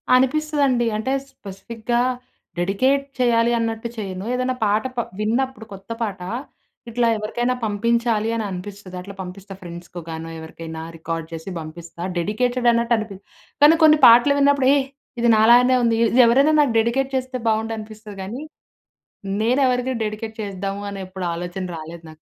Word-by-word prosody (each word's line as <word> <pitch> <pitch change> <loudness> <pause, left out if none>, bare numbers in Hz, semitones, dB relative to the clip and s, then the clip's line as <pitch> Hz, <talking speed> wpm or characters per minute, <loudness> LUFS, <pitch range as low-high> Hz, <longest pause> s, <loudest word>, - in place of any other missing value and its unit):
అనిపిస్తదండి. 275 -1 +2
అంటే 260 +5 -1 0.2
స్పెసిఫిక్‌గా 230 +2 -3 0.6
డెడికేట్ 260 +10 +1
చేయాలి 235 -1 +3
అన్నట్టు 225 0 -2
చేయను. 190 -2 -5
ఏదన్నా 255 +1 0
పాట 210 +1 +2
ప - - -1 0.2
విన్నప్పుడు 235 +2 -1
కొత్త 195 +1 -13
పాట 200 -5 -4 0.7
ఇట్లా 235 +1 +1
ఎవరికైనా 240 +4 -1
పంపించాలి 225 +1 +1
అని 225 - -1
అనిపిస్తుది 190 0 -8
అట్లా 200 +2 -9
పంపిస్తా 190 +2 -9
ఫ్రెండ్స్‌కొ 175 0 -9
గానొ 165 0 -6
ఎవరికైనా 160 0 -8 0.2
రికార్డ్ 165 0 -4
చేసి 165 +3 -7
పంపిస్తా 165 +2 -9
డెడికేటెడ్ 245 +7 +1
అన్నట్టు 235 0 +1
అనిపి 215 -3 -5 0.5
కానీ 305 +3 +8
కొన్ని 310 0 +7
పాటలు 240 +5 +7
విన్నప్పుడు 280 -2 +4
యేహ్! 275 -2 +1 0.3
ఇది 235 - +3
నాలాగానే 240 +4 +6
ఉంది 230 -1 +3 0.2
ఇది 255 - +6
ఎవరైనా 275 +6 +4
నాకు 275 -6 +1
డెడికేట్ 245 +4 +1
చేస్తే 255 0 -2
బావుండనిపిస్తది 215 -1 -4
గాని 225 +8 -6 1.0
నేను 245 +5 +2
ఎవరిది 250 +1 0
డెడికేట్ 220 +1 -4
చేస్ధాము 200 0 -4
అని 200 - -6
ఎప్పుడు 185 -1 -6
ఆలోచన 175 +2 -5
రాలేదు 165 +1 -9
నాకు. 155 - -13
220 Hz, 145 wpm, -22 LUFS, 195-250 Hz, 1.0 s, కానీ